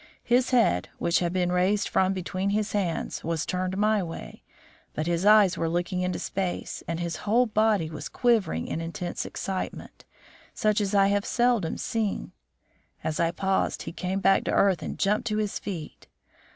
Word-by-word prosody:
His 245 Hz, +1 st, +2 dB
head, 230 Hz, -, +2 dB
which 170 Hz, -, +2 dB
he 175 Hz, -, 0 dB
had 170 Hz, +2 st, -2 dB, 0.2 s
raised 185 Hz, +3 st, +2 dB
from 190 Hz, 0 st, +2 dB
between 185 Hz, +1 st, -2 dB
his 210 Hz, +1 st, 0 dB
hands, 185 Hz, -6 st, -2 dB
was 165 Hz, -1 st, -1 dB
turned 185 Hz, +1 st, -2 dB
my 215 Hz, 0 st, +3 dB
way, 165 Hz, -2 st, -7 dB, 0.5 s
but 155 Hz, -, -1 dB
his 175 Hz, +3 st, 0 dB
eyes 210 Hz, -4 st, +6 dB
were 165 Hz, -, 0 dB
looking 175 Hz, +2 st, -1 dB
into 180 Hz, 0 st, -1 dB
space 185 Hz, -2 st, -3 dB
and 165 Hz, 0 st, -2 dB
his 170 Hz, -1 st, -3 dB
whole 230 Hz, +4 st, +2 dB
body 215 Hz, -5 st, +2 dB
was 155 Hz, -1 st, -6 dB
quivering 220 Hz, -, +1 dB
in 165 Hz, -, -3 dB
intense 170 Hz, +1 st, -4 dB
excitement, 190 Hz, -1 st, -5 dB, 0.5 s
such 215 Hz, 0 st, +2 dB
as 205 Hz, 0 st, -1 dB
I 195 Hz, 0 st, +5 dB
have 200 Hz, 0 st, +1 dB
seldom 240 Hz, -8 st, +1 dB
seen. 220 Hz, -3 st, -2 dB, 0.7 s
As 155 Hz, -, -2 dB
I 170 Hz, -, +3 dB
paused, 190 Hz, +3 st, -1 dB
he -, -, -6 dB
came 185 Hz, +3 st, -2 dB
back 195 Hz, 0 st, +4 dB
to -, -, 0 dB
earth 195 Hz, -3 st, +3 dB
and -, -, -5 dB
jumped 210 Hz, +4 st, +1 dB
to 215 Hz, -2 st, 0 dB
his 210 Hz, -2 st, -1 dB
feet. 170 Hz, -7 st, -7 dB
190 Hz, 180 wpm, -27 LUFS, 170-210 Hz, 0.7 s, eyes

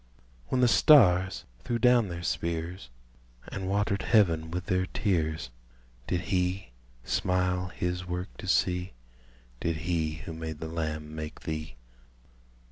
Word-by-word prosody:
When 130 Hz, -, +1 dB
the 125 Hz, -, +6 dB
stars 95 Hz, -, +5 dB
threw 120 Hz, -, -2 dB
down 120 Hz, -2 st, +4 dB
their 85 Hz, -1 st, -6 dB
spears, 85 Hz, -1 st, -3 dB, 0.6 s
And 95 Hz, -1 st, -4 dB
watered 100 Hz, 0 st, +1 dB
heaven 85 Hz, -8 st, +3 dB
with 90 Hz, +2 st, -4 dB
their 95 Hz, +1 st, 0 dB
tears, 80 Hz, -, -1 dB, 0.6 s
Did 90 Hz, -, 0 dB
he 90 Hz, -2 st, -1 dB, 0.3 s
smile 90 Hz, +4 st, 0 dB
his 90 Hz, 0 st, -3 dB
work 90 Hz, +2 st, -4 dB
to -, -, -8 dB
see? 90 Hz, 0 st, +1 dB, 0.7 s
Did 85 Hz, -1 st, -1 dB
he 80 Hz, -3 st, 0 dB
who 80 Hz, -, -6 dB
made 80 Hz, -1 st, -5 dB
the 80 Hz, -, -5 dB
lamb 75 Hz, -2 st, -4 dB
make 75 Hz, 0 st, -6 dB
thee? 80 Hz, -4 st, -5 dB
90 Hz, 130 wpm, -29 LUFS, 80-95 Hz, 0.7 s, the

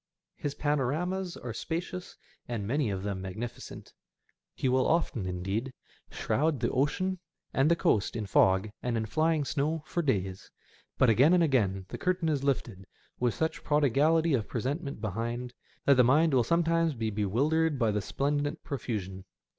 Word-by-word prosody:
His 145 Hz, -1 st, -4 dB
panoramas 155 Hz, +7 st, -1 dB
are 120 Hz, -2 st, -6 dB
spacious, 175 Hz, +7 st, -5 dB, 0.3 s
and 115 Hz, -4 st, -3 dB
many 135 Hz, +2 st, 0 dB
of 95 Hz, -1 st, -3 dB
them 100 Hz, -2 st, -3 dB
magnificent. 110 Hz, +6 st, -7 dB, 0.6 s
He -, -, -1 dB
will 130 Hz, 0 st, +3 dB
often, 140 Hz, -, 0 dB
indeed, 95 Hz, +8 st, -3 dB, 0.4 s
shroud 150 Hz, -1 st, 0 dB
the 120 Hz, -, 0 dB
ocean 185 Hz, +7 st, 0 dB, 0.3 s
and 135 Hz, +3 st, +3 dB
the 170 Hz, -, +5 dB
coast 105 Hz, -11 st, +1 dB
in 110 Hz, -2 st, -2 dB
fog 95 Hz, +1 st, +3 dB
and 120 Hz, -2 st, -1 dB
in 110 Hz, -, -1 dB
flying 155 Hz, +4 st, +1 dB
snow 150 Hz, +3 st, -1 dB
for 175 Hz, -, -1 dB
days; 95 Hz, -, -2 dB, 0.5 s
but 130 Hz, -3 st, +5 dB
again 135 Hz, -, +5 dB
and 175 Hz, -, +4 dB
again 100 Hz, -, +1 dB
the -, -, -6 dB
curtain 180 Hz, -3 st, 0 dB
is 145 Hz, -3 st, 0 dB
lifted, 115 Hz, -8 st, -2 dB, 0.3 s
with 125 Hz, -2 st, +1 dB
such 160 Hz, 0 st, -2 dB
prodigality 150 Hz, +3 st, +3 dB
of 115 Hz, -6 st, 0 dB
presentment 140 Hz, +2 st, -3 dB
behind, 120 Hz, +4 st, -3 dB, 0.3 s
that 140 Hz, -2 st, +5 dB
the 125 Hz, -, +7 dB
mind 150 Hz, +5 st, +4 dB
will 125 Hz, -2 st, +4 dB
sometimes 165 Hz, +2 st, +2 dB
be 110 Hz, -2 st, -2 dB
bewildered 140 Hz, +10 st, +1 dB
by 115 Hz, -4 st, +2 dB
the 105 Hz, 0 st, -1 dB
splendid 145 Hz, +6 st, -1 dB
profusion. 100 Hz, -8 st, -4 dB
130 Hz, 160 wpm, -29 LUFS, 110-155 Hz, 0.6 s, the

